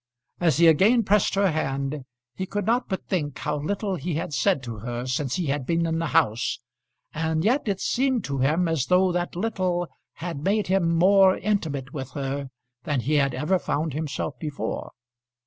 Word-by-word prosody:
As 165 -4 +2
he 170 - +5
again 200 +9 +5
pressed 205 0 +2
her 195 -2 +3
hand 140 -2 -2 0.3
he 190 +6 -4
could 205 0 -3
not 240 +3 +1
but 190 - -3
think 145 -7 -2
how 150 0 -2
little 195 +5 -2
he 170 -1 -3
had 155 -1 -3
said 130 +1 +1
to 115 -2 -6
her 120 +2 -4
since 130 +1 -1
he 180 -2 -1
had 140 -2 -2
been 170 0 +1
in 165 0 -1
the 165 - -1
house, 110 -4 +1 0.6
and 160 0 -1
yet 250 +3 +2
it 195 -2 0
seemed 260 -1 +1
to 140 -4 -3
him 155 +7 +2
as 160 -6 0
though 185 0 +4
that 175 0 -2
little 180 -3 -1 0.3
had 170 -3 -5
made 205 +3 +1
him 185 -3 +2
more 190 +1 +5
intimate 155 -10 -2
with 135 -3 -5
her 140 -1 -3 0.3
than 145 -4 -1
he 145 +6 -1
had 140 -3 +2
ever 155 +8 +1
found 155 -2 -2
himself 150 -1 -3
before. 150 -3 -4
165 Hz, 190 wpm, -25 LUFS, 140-190 Hz, 0.6 s, he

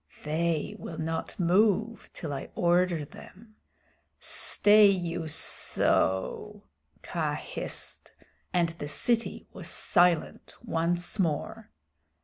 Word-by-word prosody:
"They 160 0 -1
will 160 - -7
not 160 +3 -4
move 210 +5 +1
till 155 -4 -6
I 135 - -6
order 175 -2 +2
them. 215 +8 -15 0.6
Stay 210 0 +5
you 175 -4 -1
sssso!" 155 - 0 0.4
Kaa - - -2
hissed, - - -5 0.4
and 175 -2 +2
the 165 -3 -7
city 230 +9 -1
was - - -7
silent 175 -2 +1
once 175 +4 -1
more. 160 -6 -2
175 Hz, 100 wpm, -28 LUFS, 160-200 Hz, 0.6 s, Stay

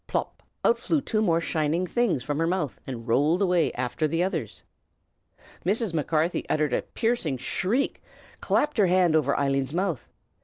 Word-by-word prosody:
pop! - - -3 0.2
out 470 - +4
flew 320 - +1
two 220 -5 -1
more 170 -6 +3
shining 165 +1 0
things 195 - 0
from 145 +3 -2
her 165 - +1
mouth 175 -6 -2
and 120 -3 -6
rolled 145 +9 +3
away 180 -4 +2
after 130 +5 -1
the 165 +3 0
others. 125 - -3 1.0
Mrs. 205 +1 +1
Macarthy 160 +2 0
uttered 150 -4 +1
a - - +1
piercing 225 - -1
shriek, 220 - -1 0.3
and - - -27
clapped 295 -5 +1
her 200 - +5
hand 180 -2 +3
over 140 -3 +2
Eileen's 135 +1 0
mouth. 180 - -2
165 Hz, 165 wpm, -26 LUFS, 145-190 Hz, 1.0 s, her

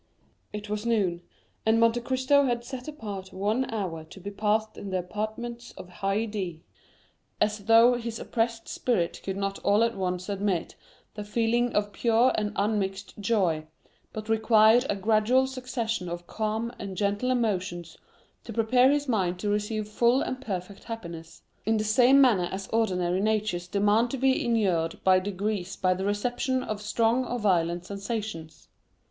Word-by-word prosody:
It 210 0 -6
was 210 0 -3
noon, 200 -7 0 0.4
and 220 +1 +3
Monte 230 +1 +3
Cristo 260 +3 +2
had 240 -2 -1
set 255 +1 -7
apart 205 -10 -7
one 215 +7 -1
hour 180 -8 -3
to 160 - -13
be 200 +2 -6
passed 215 +1 0
in 200 - -7
the 185 - -1
apartments 220 +6 -5
of 180 - -10
Haydée, 195 -3 -2 0.8
as 210 -1 0
though 230 +2 +7
his 235 -2 -4
oppressed 230 -1 -2
spirit 200 -9 -1
could 195 0 -3
not 195 0 -2
all 205 +3 +3
at 230 0 0
once 180 -1 -2
admit 200 -3 -1 0.4
the 210 - -6
feeling 235 +3 +1
of 205 0 0
pure 235 +2 +3
and 210 -1 -1
unmixed 200 -1 -2
joy, 185 -8 +1 0.4
but 215 0 -7
required 220 +2 +5
a - - +1
gradual 220 +6 +3
succession 240 -7 -3
of 175 0 -6
calm 220 +3 -2
and 190 -2 -6
gentle 205 +4 0
emotions 185 -8 -1 0.5
to 235 - -8
prepare 240 +4 +4
his 290 0 +1
mind 185 -7 0
to 205 +3 -2
receive 210 +1 -1
full 235 +5 +2
and 255 0 -4
perfect 195 -3 -6
happiness, 170 -8 -8 0.2
in 220 +1 +1
the 215 - 0
same 245 +5 +5
manner 210 -10 +4
as 190 0 -5
ordinary 185 -5 +1
natures 215 -4 0
demand 205 +5 +2
to 270 - -3
be 265 +1 +2
inured 190 -9 +1
by 185 -1 +5
degrees 195 0 -3
to 185 -1 +2
the 190 +1 -3
reception 245 +5 -1
of 215 -3 -4
strong 230 +3 +1
or 245 0 -3
violent 175 -5 +1
sensations. 200 -4 -5
215 Hz, 160 wpm, -27 LUFS, 190-235 Hz, 0.8 s, though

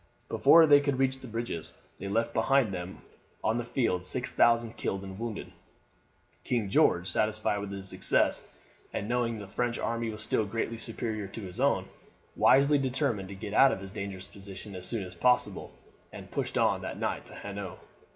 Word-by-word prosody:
Before 165 -1 +7
they 145 -2 +7
could 140 -2 0
reach 130 0 +1
the 130 - -10
bridges 115 -8 -5 0.2
they 100 - -5
left 115 +4 0
behind 135 -7 +2
them 90 0 -6 0.4
on 115 +2 +1
the - - -2
field 115 -7 0
six 90 - -1
thousand 115 -1 +3
killed 95 0 -3
and 95 0 -8
wounded. 115 -2 -5 0.9
King 115 -5 -1
George, 90 -2 +3
satisfied 110 -1 +1
with 100 -1 -5
his 95 -1 -4
success, - - +2 0.5
and 100 - -3
knowing 120 -1 0
that 105 - -7
the 95 - -16
French 120 0 0
army 115 0 -2
was 110 0 -3
still 110 - +1
greatly 115 +2 -3
superior 110 -3 -3
to 105 +4 -8
his 90 -2 -6
own, - - +2 0.5
wisely 140 +2 +5
determined 130 -7 -1
to 100 - -7
get 105 +1 -6
out 135 +4 +7
of - - -3
his 95 0 -9
dangerous 100 -3 -5
position 100 0 -9
as 90 0 -2
soon 115 -4 -1
as 90 -1 -9
possible, 125 +8 +1 0.4
and - - -10
pushed - - -2
on - - +2
that - - -5
night - - -3
to - - -10
Hanau. 100 -2 -6
110 Hz, 190 wpm, -29 LUFS, 95-120 Hz, 0.9 s, Before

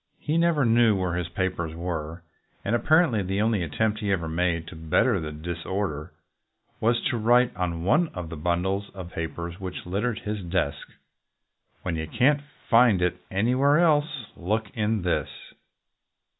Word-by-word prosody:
He 150 - -2
never 165 -4 +3
knew 115 -1 +4
where 90 -2 -1
his 85 -1 -2
papers 85 -2 -2
were, 85 -1 -4 0.4
and - - 0
apparently 155 - +3
the 95 +1 -2
only 110 -2 +2
attempt 105 +7 0
he 105 -2 -1
ever 85 -4 0
made 85 0 0
to - - -10
bet 80 -1 +2
ter 115 -7 +2
the 75 -2 -5
disorder 85 +1 -4 0.7
was 115 +2 +2
to 120 - -1
write 120 +3 +4
on 85 -2 -2
one 155 - +3
of 90 -3 -5
the 85 - -6
bun 85 +3 0
dles 100 +2 -2
of 90 -2 -8
papers 85 +2 -5
which 95 -2 -6
littered 105 +5 -1
his 105 -1 -4
desk, 85 -5 -2 1.0
"When 85 -3 -2
you 80 0 -3
can't 140 - +3 0.3
find 115 -4 +5
It 90 0 0
anywhere 125 +9 +3
else, 150 -5 +2
look 105 +4 -2
in 110 -2 0
this." 90 - 0
95 Hz, 165 wpm, -26 LUFS, 85-115 Hz, 1.0 s, find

